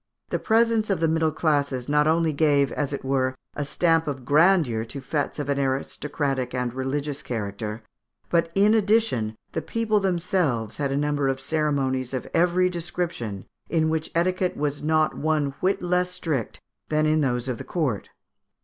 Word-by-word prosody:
The - - -1
presence 225 -1 +2
of 195 -4 +1
the 165 - +2
middle 160 0 +2
classes 145 -5 0
not 150 +1 +3
only 160 0 +2
gave, 140 -2 +3
as 145 -2 -2
it 140 - -5
were, 130 -1 +1 0.2
a 145 - -2
stamp 165 +2 +2
of 135 -3 -4
grandeur 150 -6 +4
to 120 +5 -7
fêtes 145 +2 -2
of 145 -2 -3
an 140 -1 0
aristocratic 135 -1 -2
and 125 -1 -1
religions 140 +2 -3
character, 105 -2 -4 0.4
but, 170 -1 +2
in 205 +2 +5
addition, 210 - +2 0.2
the 160 - -2
people 220 +1 0
themselves 175 - 0
had 140 -2 -1
a 135 - 0
number 145 -1 0
of 135 0 0
ceremonies 135 -3 0
of 130 - -4
every 180 +2 +3
description, 170 - -3 0.2
in 160 -2 +2
which 160 0 -1
etiquette 180 +2 +1
was 145 -1 -1
not 155 +1 +2
one 150 -2 0
whit 185 0 0
less 180 0 +1
strict 155 -9 -3 0.3
than 155 0 +2
in 155 0 +3
those 125 -3 0
of 125 -3 -3
the - - -5
court. 140 - -2
150 Hz, 170 wpm, -25 LUFS, 135-170 Hz, 0.4 s, in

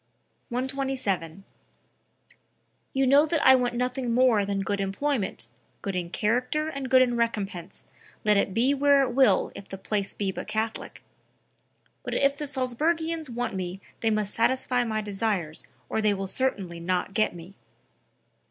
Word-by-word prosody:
127. 250 -9 -2 1.5
"You 270 0 +1
know 285 +4 +5
that 320 -2 0
I 265 - +9
want 245 -2 +2
nothing 250 0 -1
more 240 -5 +4
than 200 0 -1
good 200 0 -1
employment, 205 +2 -2 0.4
good 195 -2 -3
in 175 -1 -2
character 250 - 0
and 275 -4 -5
good 260 0 +7
in 245 -1 0
recompense, 200 -6 -3 0.4
let 210 -1 +5
it 200 0 +2
be 240 +7 +2
where 280 0 +4
it 255 - -1
will 245 -6 +3
if 200 - -11
the 195 - -6
place 200 +1 -2
be 195 -2 -1
but - - -7
Catholic...; 220 0 -4 1.0
but - - -4
if 280 0 +3
the 295 +1 -4
Salzburgians 310 +5 -1
want 240 -1 -3
me 185 0 -4 0.2
they 225 - +1
must 215 -2 0
satisfy 250 +1 +1
my 220 -2 -1
desires 195 -6 -2 0.2
or 220 - -1
they 210 -1 +2
will 195 0 -3
certainly 190 -6 -2
not 180 +3 -1
get 215 -3 +1
me." 175 +3 -11
230 Hz, 155 wpm, -26 LUFS, 195-265 Hz, 1.5 s, I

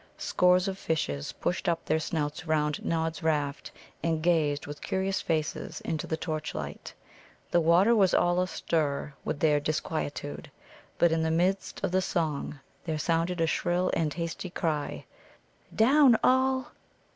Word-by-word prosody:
Scores 180 +1 +3
of 195 0 -3
fishes 70 - -2
pushed 180 0 -1
up 170 -1 -1
their 160 - +1
snouts 155 +1 -3
round 150 -1 0
Nod's 160 -1 -1
raft, 150 -3 -1 0.3
and 160 -1 -1
gazed 155 -4 +2
with 145 0 -8
curious 190 0 -1
faces 155 -2 -2
into 160 -2 -3
the 160 - -1
torchlight. 155 - -5 0.6
The 175 - +4
water 175 +8 +5
was 195 -4 +4
all 175 +1 +3
astir 150 -5 -1
with 155 - -3
their 150 -2 +4
disquietude. 145 - -3 0.5
But 170 - +4
in 165 0 +1
the 160 - +1
midst 180 +4 0
of - - 0
the 185 +1 +2
song 155 -5 -2 0.2
there 160 -2 -2
sounded 165 +3 0
a - - +4
shrill 175 +2 0
and 155 -2 +1
hasty 170 +3 -4
cry: 155 -5 -2 0.7
"Down 260 +1 +6
all!" 260 0 +2
165 Hz, 145 wpm, -28 LUFS, 150-180 Hz, 0.7 s, Down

